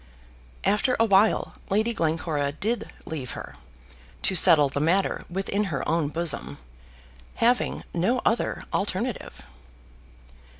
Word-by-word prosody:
After 230 +5 +2
a 225 - +5
while 205 0 +3 0.2
Lady 215 +4 +1
Glencora 160 -5 -1
did 225 +9 -2 0.2
leave 140 -6 -5
her, - - -8 0.7
to - - +3
settle 165 -5 +7
the 140 +1 -3
matter 175 +6 +1
within 195 +3 -1
her 155 -8 -3
own 165 -2 +1
bosom, 165 +1 -3 0.8
having 245 +2 +1
no 205 +9 +1
other 230 - 0
alternative. 205 +4 -2
190 Hz, 115 wpm, -25 LUFS, 160-215 Hz, 0.8 s, settle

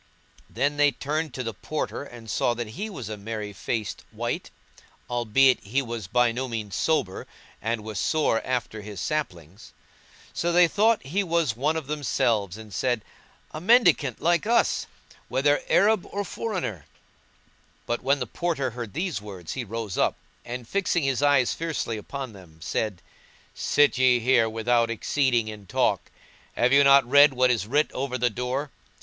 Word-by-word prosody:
Then 145 +1 -1
they 145 0 +5
turned 155 +2 -3
to 130 - -3
the 115 -1 -4
Porter 150 +7 -4
and 120 -5 -12
saw 120 +2 +1
that 120 -2 -4
he 200 - -5
was 130 - -7
a 110 -1 -5
merry 105 0 -5
faced 105 +1 -4
wight, - - -3 0.6
albeit 120 +2 +3
he 130 +8 -1
was 115 -5 -5
by 120 +3 +3
no 130 +3 -3
means 110 -5 -4
sober 150 - 0 0.3
and 115 0 -2
was 110 -3 -5
sore 150 -8 +1
after 120 -4 -3
his 105 -2 -8
slappings. 95 - -4 0.6
So 175 - 0
they 175 0 +6
thought 215 +6 +3
that 135 - -11
he 200 +6 +1
was 165 -9 0
one 145 +6 0
of 160 - -4
themselves 115 -9 0
and 110 -2 -11
said, 120 +1 0 0.5
"A 155 - -6
mendicant 185 - +4
like 175 +4 +1
us! 235 +1 +2 0.4
whether - - +2
Arab 215 - +3
or 205 - -3
foreigner."[FN#169] 180 - -4 1.0
But 120 - -2
when 140 +2 +2
the 125 - -3
Porter 140 -1 -2
heard 120 -2 -7
these 170 - -2
words, 95 -5 -7
he 130 - -3
rose 115 -2 -5
up, - - +2 0.3
and 120 -1 -6
fixing 185 -2 0
his 135 -1 0
eyes 140 -4 +3
fiercely 160 -8 -3
upon 130 +3 -6
them, 90 -5 -15
said, 95 +2 -3 0.5
"Sit 145 -3 +2
ye 125 -1 +5
here 120 -1 +3
without 115 +1 +1
exceeding 120 0 +1
in 105 -2 -8
talk! - - 0 0.5
Have 125 +2 +3
you 140 0 +7
not 140 -2 +6
read 145 +2 +7
what 125 0 +4
is 110 -4 -1
writ 145 +6 +2
over 130 -1 -3
the 125 -1 +1
door? 125 +5 -3
125 Hz, 170 wpm, -25 LUFS, 110-145 Hz, 1.0 s, you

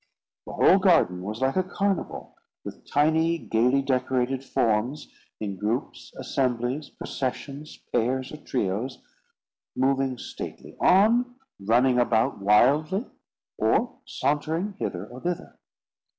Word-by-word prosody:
The - - -7
whole 195 - +5
garden 165 - +3
was 105 +5 -5
like 135 0 +1
a 185 - +3
carnival, 195 0 -3 0.3
with - - -9
tiny, 160 +3 +2
gaily 125 0 +1
decorated 130 0 0
forms, 120 +4 -1 0.3
in 100 -3 -4
groups, 110 +7 -3
assemblies, 130 +2 -1
processions, 140 +3 -5 0.2
pairs 125 +2 0
or 150 - -7
trios, 120 -2 -2 0.8
moving 135 -1 +1
stately - - -8
on, 235 +6 +4 0.2
running 125 +5 +3
about 120 +1 +2
wildly, 145 - +3 0.5
or 240 - +1
sauntering 160 +8 -1
hither 90 +2 -3
or 125 +3 -11
thither. 175 -1 -4
130 Hz, 110 wpm, -26 LUFS, 120-155 Hz, 0.8 s, whole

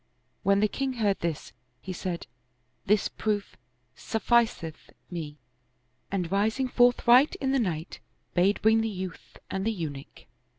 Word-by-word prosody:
When 200 +1 +3
the 215 - +4
king 270 +4 -2
heard 210 -5 +1
this, 165 -3 -3 0.3
he 185 - -6
said, 175 -1 -4 0.3
" 125 +1 -44
This 210 0 +3
proof 210 -2 -2 0.4
sufficeth 225 - 0 0.2
me," 155 -4 -5 0.7
and 180 -3 -2
rising 220 +6 +1
forthright 245 +2 +5
in 265 -1 -1
the 270 - +2
night, 170 -7 -3 0.3
bade 190 +4 +3
bring 220 +1 +5
the 225 - -1
youth 185 -5 -7
and 190 - -2
the 225 - +1
Eunuch. 150 -9 -7
200 Hz, 140 wpm, -28 LUFS, 170-225 Hz, 0.7 s, forthright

